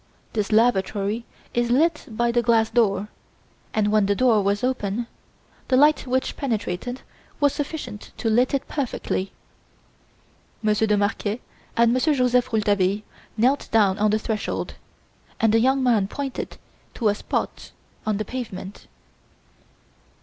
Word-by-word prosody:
This 210 -1 -1
lavatory 215 0 +2 0.3
is 240 0 +1
lit 305 +6 +2
by 235 +1 0
the 240 0 +2
glass 225 -1 +3
door, 210 -3 +2 0.6
and, 210 -1 +1
when 210 -2 +3
the 200 - +2
door 235 -2 +4
was 200 +2 0
open, 240 -3 -1 0.6
the 255 - +3
light 295 0 +4
which 260 +1 0
penetrated 245 -1 -3 0.4
was 285 -2 +3
sufficient 285 -8 -5
to - - -2
light 245 +5 +3
it 275 - -3
perfectly. 230 -8 -2 1.3
Monsieur 215 +1 +2
de 210 -1 +3
Marquet 205 +2 -1 0.4
and 235 0 +5
Monsieur 285 +4 +2
Joseph 250 -1 +2
Rouletabille 205 -2 +1 0.3
knelt 260 +6 +2
down 205 -3 +3
on 215 0 +3
the 215 - +2
threshold, 220 -1 -3 0.7
and 220 -1 +3
the 225 - +5
young 265 +3 +3
man 225 -6 +3
pointed 275 +4 -5 0.4
to 225 - 0
a - - +3
spot 205 - -3 0.3
on 215 -2 0
the 215 - -3
pavement. 205 -5 -7
225 Hz, 140 wpm, -24 LUFS, 210-250 Hz, 1.3 s, and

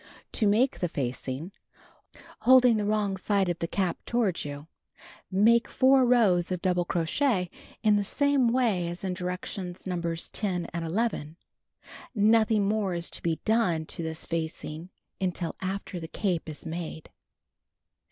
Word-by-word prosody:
To 215 - +2
Make 230 +6 +2
the 175 - -1
Facing: 135 +4 -4 0.9
Holding 250 -2 +6
the 210 - -1
wrong 205 -2 0
side 195 -1 +1
of 175 - -2
the 165 - -2
cap 185 -1 -1
toward 225 -7 0
you, 145 0 -7 0.6
make 225 +5 +4
4 260 -1 +4
rows 195 -8 +3
of 180 - -1
double 180 -2 +1
crochet 180 - 0 0.3
in 210 -1 +5
the 205 - +1
.same 285 +3 +2
way 225 -9 +1
as 175 +2 -6
in 190 -1 -1
directions 180 0 -5
Nos. 170 -3 -2
10 180 -5 -1
and 170 0 -3
11. 165 -3 -2 0.8
Nothing 215 -1 +4
more 205 -3 0
is 170 0 -3
to - - -5
be 165 -2 -1
done 200 -8 +2
to 170 - -4
tliis 160 0 -2
fachig 160 0 -4 0.3
until 180 -2 -2
after 190 -1 -4
the 165 - -6
cape 175 -2 -2
is 155 - -8
made. 160 -1 -6
185 Hz, 150 wpm, -28 LUFS, 170-215 Hz, 0.9 s, Holding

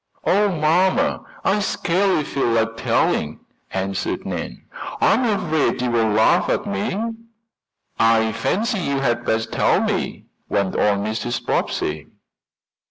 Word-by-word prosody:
"Oh, 205 +2 +3
mamma, 185 - +2 0.2
I 200 +2 +3
scarcely 190 -3 +1
feel 140 -2 -1
like 115 -1 +1
telling," 75 -8 0 0.3
answered 95 0 -3
Nan. - - -5 0.4
"I - - +4
am 255 - +1
afraid 160 - 0
you'll 125 -1 0 0.2
laugh 110 +12 +3
at 210 - 0
me." 205 0 -2 1.0
"I 115 -1 +4
fancy 215 - -1
you 140 -5 -1
had 120 -2 0
best 110 0 -1
tell - - +2
me," - - -2 0.2
went 100 -2 0
on 100 -1 +1
Mrs. 110 +3 -3
Bobbsey. 75 0 -1
135 Hz, 125 wpm, -21 LUFS, -, 1.0 s, I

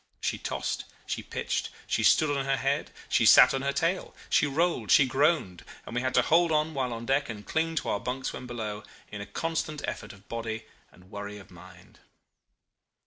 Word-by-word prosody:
She - - -2
tossed, - - -3 0.2
she - - -3
pitched, - - -3 0.2
she - - 0
stood 145 -2 +4
on 135 -1 -1
her 135 0 +1
head, 135 +2 0 0.2
she - - +2
sat - - +8
on 135 - -1
her 140 +1 0
tail, 165 +6 -1 0.2
she 150 - +4
rolled, 165 +5 0
she 140 -5 +7
groaned, 135 - +1 0.2
and - - -8
we 120 - 0
had 130 0 -1
to - - +5
hold 170 +1 +4
on 155 +1 +1
while 130 -3 -1
on 115 0 -5
deck 135 +2 +1
and 105 -2 -7
cling 165 +1 -1
to 160 - -1
our 100 - 0
bunks 130 +3 -3
when 125 - -7
below, 110 -4 -4 0.3
in 100 -1 -6
a 100 - -7
constant 160 -2 -3
effort 105 - -5
of 100 0 -17
body 110 -1 -4 0.3
and 90 +2 -20
worry 100 0 -6
of 100 - -14
mind. - - -15
135 Hz, 200 wpm, -28 LUFS, 110-155 Hz, 0.3 s, sat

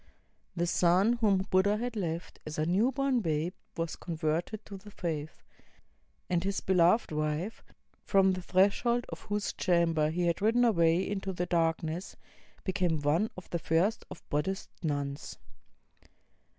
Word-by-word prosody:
The 175 -1 0
son 180 +6 +3
whom 195 -4 +2
Buddha 200 +3 +3
had 240 +1 -3
left 170 -4 -4
as 155 - -6
a 155 - +1
new 200 +10 +2
born 275 -1 +1
babe 165 -2 -1 0.2
was 165 -1 -2
con 170 -3 -6
verted 170 +7 -2
to 200 - -8
the 205 +2 -13
faith; 160 -6 -5 0.8
and 175 -1 0
his 195 0 -1
beloved 180 +3 +3
wife, 155 +7 -2 0.4
from 195 -1 +4
the 185 - -4
threshold 205 +7 +2
of - - -7
whose 205 0 -2
chamber 165 -4 +2
he 175 +2 -1
had 170 +1 0
ridden 230 +4 +4
away 170 -4 +3
into 195 -1 -3
the 180 0 -2
darkness, 165 0 -1 0.5
became 180 -5 0
one 165 +9 +2
of 185 - -9
the 170 - -1
first 170 +7 +1
of - - -11
Buddhist 160 +7 -2
nuns. 145 -3 -3
180 Hz, 150 wpm, -30 LUFS, 165-200 Hz, 0.8 s, from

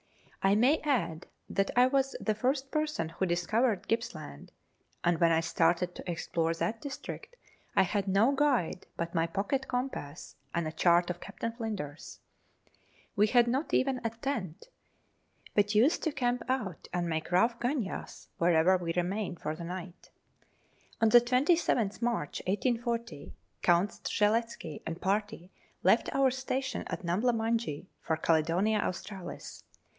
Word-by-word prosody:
I 195 +1 +4
may 255 +9 +4
add 180 - -1 0.2
that 195 0 0
I 245 +1 +7
was 270 +1 +1
the 215 - 0
first 265 +5 -1
person 305 - -1
who 185 +3 -2
discovered 205 +6 +1
Gipps 230 +1 -1
land, 150 - -10 0.5
and 170 -1 +2
when 170 -1 +4
I 160 - +4
started 170 +2 +1
to - - -8
explore 165 0 -1
that 220 +6 -2
district 285 - -7 0.4
I - - +6
had 200 +1 -1
no 200 +7 +4
guide 265 - +1
but 170 0 -3
my 165 -1 +1
pocket 210 +10 -1
compass 245 - -4 0.2
and 170 -2 0
a - - -3
chart 175 +2 +3
of 175 - -7
Captain 230 - -5
Flinders. 210 - -6 1.0
We 210 +1 +4
had 240 +1 +4
not 265 +6 0
even 260 -1 +1
a 230 - +1
tent, 230 - -5 0.8
but 205 0 +2
used 250 +10 +4
to 320 - 0
camp 250 -3 0
out 220 -10 -2
and 175 -1 -1
make 160 0 -3
rough 230 +7 +3
gunyahs 245 -5 -3
wherever 170 +2 +4
we 170 -2 -3
remained 180 +1 -2
for 155 - -3
the 170 - -8
night. 180 +1 -7 0.9
On 225 - +4
the 240 +2 +8
27th 250 - +2
March 235 -11 -1
1840, 230 - -2 0.3
Count 175 +3 +3
Strzelecki 210 -6 -1
and 165 +1 -4
party 200 -2 -2 0.3
left - - +4
our 270 -1 +4
station 260 -1 -3
at 180 0 -5
Numbla 210 +9 +2
Munjee 225 -8 -1 0.2
for 160 - -1
Caledonia 170 +7 +2
Australis. 190 -1 -5
205 Hz, 150 wpm, -30 LUFS, 175-245 Hz, 1.0 s, the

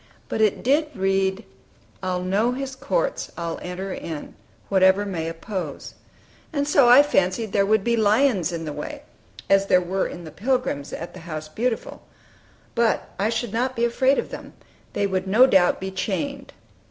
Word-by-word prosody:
But 220 - -1
it 215 -2 +2
did 290 +5 +3
read 195 +1 0 0.6
"I 185 -1 -1
know 195 +7 +1
his 265 0 -5
courts; - - -2
I'll 170 -1 -4
enter 185 +2 -5
in, 160 -3 -6 0.3
Whatever 190 +1 +4
may 165 -5 -3
oppose;" 165 -2 -6 0.6
and 285 -3 -1
so 280 -4 +5
I 255 +4 +9
fancied 195 -5 0
there 200 -1 +2
would 215 -1 +3
be 235 +1 +2
lions 215 - +2
in 165 -1 -4
the 150 - -4
way, - - -7 0.4
as 195 0 +3
there 185 - +5
were 185 +2 -1
in 175 - -8
the 160 - -9
Pilgrim's, 235 - -1
at 170 - -6
the 185 - -10
"House 155 -2 -7
Beautiful"; 230 +7 -3 0.7
but 235 -1 +1
I 205 +3 +2
should 230 -1 -2
not 250 +3 0
be 235 - +1
afraid 260 +3 +2
of - - -3
them; - - -8 0.4
they 200 - 0
would 190 -1 -1
no 220 +7 +6
doubt 190 -9 +3
be 190 0 -4
chained. 270 +9 -3
195 Hz, 175 wpm, -23 LUFS, 185-245 Hz, 0.7 s, I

